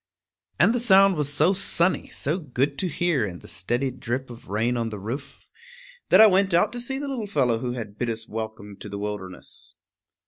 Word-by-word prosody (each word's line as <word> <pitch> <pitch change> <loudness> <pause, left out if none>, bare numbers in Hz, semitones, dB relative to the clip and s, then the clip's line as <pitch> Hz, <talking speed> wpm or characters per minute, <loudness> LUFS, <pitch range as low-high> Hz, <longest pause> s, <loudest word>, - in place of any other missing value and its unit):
_ - - -66 0.6
And 225 - +3
the 245 - +1
sound 195 -4 +6
was 150 -2 -1
so 155 +6 +3
sunny, 185 -1 +1
so 155 +7 -1
good 140 -2 -1
to 185 - 0
hear 170 -5 0
in 90 -4 -4
the - - -14
steady 120 +9 -1
drip 130 0 -4
of 120 - -12
rain 115 +4 0
on 115 -1 -1
the 105 - -6
roof, 135 +8 -7 0.6
that 185 - +6
I 220 - +11
went 195 -3 +4
out 175 - +3
to 245 - -4
see 265 +3 -3
the 285 +1 -4
little 250 -6 -3
fellow 125 - +1
who 120 0 -3
had 110 -4 -7
bid 120 - -1
us 115 0 -4
welcome 110 -2 -6
to 105 - -9
the 100 - -5
wilderness. 100 -3 -6
130 Hz, 215 wpm, -25 LUFS, 110-185 Hz, 0.6 s, I